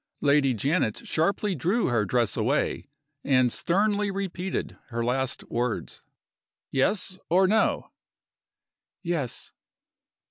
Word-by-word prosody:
Lady 140 Hz, -3 st, +3 dB
Janet 135 Hz, -, 0 dB
sharply 200 Hz, +5 st, +1 dB
drew 185 Hz, -, +1 dB
her 115 Hz, -3 st, +1 dB
dress 115 Hz, 0 st, +1 dB
away, -, -, 0 dB, 0.4 s
and 130 Hz, -3 st, +3 dB
sternly 205 Hz, +3 st, +1 dB
repeated 190 Hz, -2 st, -3 dB
her 115 Hz, -1 st, -3 dB
last 130 Hz, +1 st, -1 dB
words. 120 Hz, -1 st, -3 dB, 0.7 s
"Yes? 185 Hz, +7 st, 0 dB
or 185 Hz, +3 st, +5 dB
No?" 220 Hz, +3 st, +1 dB, 1.1 s
"Yes." 165 Hz, -8 st, -2 dB
155 Hz, 100 wpm, -26 LUFS, 125-190 Hz, 1.1 s, or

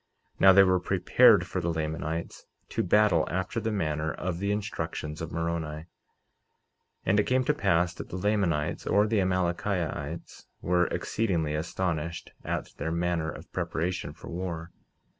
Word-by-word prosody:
Now 95 Hz, -, +8 dB
they 100 Hz, +1 st, +8 dB
were 95 Hz, -1 st, +3 dB
prepared 95 Hz, +3 st, +5 dB
for 90 Hz, 0 st, -3 dB
the 85 Hz, 0 st, 0 dB
Lamanites, 80 Hz, +1 st, -4 dB, 0.2 s
to -, -, -1 dB
battle 95 Hz, -3 st, +3 dB
after 95 Hz, +6 st, -2 dB
the 110 Hz, 0 st, -2 dB
manner 80 Hz, -6 st, -1 dB
of 85 Hz, +1 st, -3 dB
the 100 Hz, +1 st, 0 dB
instructions 80 Hz, -7 st, -3 dB
of 80 Hz, -, -5 dB
Moroni. 85 Hz, -1 st, -2 dB
49:9 -, -, -14 dB, 1.2 s
And 100 Hz, +3 st, +3 dB
it 105 Hz, -, +1 dB
came 130 Hz, 0 st, +3 dB
to 150 Hz, -, +2 dB
pass 90 Hz, -, +2 dB
that -, -, -8 dB
the -, -, -6 dB
Lamanites, 90 Hz, -6 st, 0 dB
or 105 Hz, +1 st, +4 dB
the 110 Hz, -1 st, +1 dB
Amalickiahites, 90 Hz, -4 st, -2 dB
were 90 Hz, -1 st, +2 dB
exceedingly 85 Hz, -9 st, -1 dB
astonished 85 Hz, +1 st, -3 dB
at -, -, -3 dB
their 80 Hz, -, -2 dB
manner 85 Hz, -1 st, 0 dB
of -, -, -10 dB
preparation 90 Hz, +3 st, -2 dB
for -, -, -11 dB
war. 85 Hz, -1 st, -4 dB
90 Hz, 155 wpm, -28 LUFS, 80-95 Hz, 1.2 s, Now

